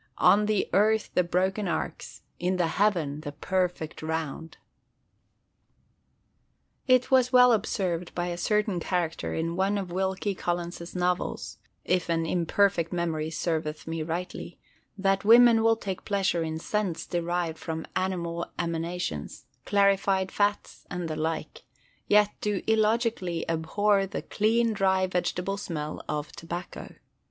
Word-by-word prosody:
"On 210 +1 +5
the 215 -2 +1
earth 215 +2 +3
the 180 - +3
broken 190 +4 0
arcs: - - -4 0.2
in 180 +1 0
the 175 - +2
heaven 165 -5 0
the 145 -2 -6
perfect 180 0 -2
round!" 160 0 -4 2.3
It 255 0 +4
was 255 -1 +4
well 250 -1 +7
observed 185 -5 -1
by 175 0 -1
a 175 - -3
certain 210 +1 0
character 170 -1 -2
in 165 +1 -2
one 195 +3 +1
of 190 -3 -4
Wilkie 190 +2 -1
Collins's 175 -1 -4
novels 180 0 -2 0.3
(if 180 -2 0
an 165 -1 +1
imperfect 175 +1 +1
memory 165 -3 -1
serveth 160 -2 -2
me 165 0 -3
rightly) 170 +3 -5 0.4
that 195 0 +1
women 230 +1 +7
will 225 0 +4
take 195 -4 -5
pleasure 195 -4 0
in 160 -1 -2
scents 190 0 -2
derived 175 -1 -2
from 160 -1 -4
animal 170 -2 -2
emanations, 165 - -3 0.2
clarified 195 -1 +2
fats, 205 0 -1
and 180 -2 -4
the 155 - -2
like; 160 +1 -3 0.5
yet 210 0 +5
do 210 -2 -1
illogically 220 -5 +1
abhor 195 +5 +1
the - - -5
"clean, 225 +2 +1
dry, 190 -2 +2
vegetable 180 +1 -1
smell" 155 -6 -5
of 150 0 -3
tobacco. 170 +2 -7
180 Hz, 130 wpm, -27 LUFS, 165-205 Hz, 2.3 s, well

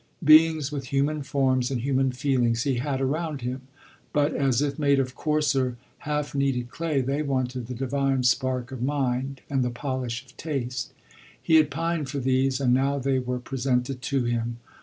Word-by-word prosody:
Beings 155 -1 +6
with 140 -2 -4
human 145 +3 0
forms 130 -3 +1
and 130 -3 -2
human 135 0 +1
feelings 125 -3 +1
he 135 -3 0
had 135 0 -1
around 150 +1 -1
him; 125 +2 -4 0.5
but, 145 0 +2
as 135 -4 +1
if 145 0 -1
made 140 -2 +3
of 130 -1 -1
coarser, 135 -5 0 0.2
half 150 -1 -2
kneaded 135 -3 0
clay, 160 -4 -1
they 135 +3 -1
wanted 130 -4 -2
the 125 - -5
divine 135 +1 0
spark 125 0 +1
of 130 -3 -6
mind 135 -1 -1
and 135 -2 0
the 125 - 0
polish 125 0 -4
of 130 - -20
tas; 130 -6 -3 0.5
He 160 - +4
had 155 -2 +4
pined 165 -1 -2
for 145 - -4
these, 130 0 +1
and 125 -3 +3
now 135 +2 +2
they 135 -1 +1
were 125 0 -2
presented 125 0 -1
to 135 +1 0
him. 120 0 -1
135 Hz, 180 wpm, -26 LUFS, 125-140 Hz, 0.5 s, Beings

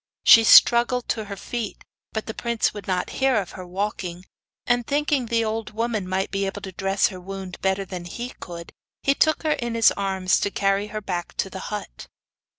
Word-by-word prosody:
She 225 - +9
struggled 240 +2 +6
to 220 -2 -1
her 200 0 -6
feet, 230 +1 -5 0.3
but 220 - -3
the 220 - -5
prince 235 -1 -1
would 205 -1 -9
not 185 -1 -1
hear 265 -1 +4
of 200 -5 -1
her 185 -1 -9
walking, 185 -2 -4 0.4
and 245 -1 +1
thinking 290 -3 +1
the 230 0 +1
old 220 0 -3
woman 220 -4 -2
might 190 +1 -1
be 195 0 -1
able 200 +1 -6
to 190 - -6
dress 195 +1 +1
her 185 -3 -9
wound 190 0 -8
better 190 0 0
than 180 -2 -7
he 240 +8 -6
could, 170 -1 -8 0.3
he 275 - +4
took 315 +3 +2
her 310 - +1
in 235 -4 -3
his 230 -1 +5
arms 190 -2 0
to - - 0
carry 200 +1 0
her 215 0 -5
back 175 -4 -4
to - - -1
the - - -6
hut. - - -7
205 Hz, 205 wpm, -24 LUFS, 190-235 Hz, 0.4 s, She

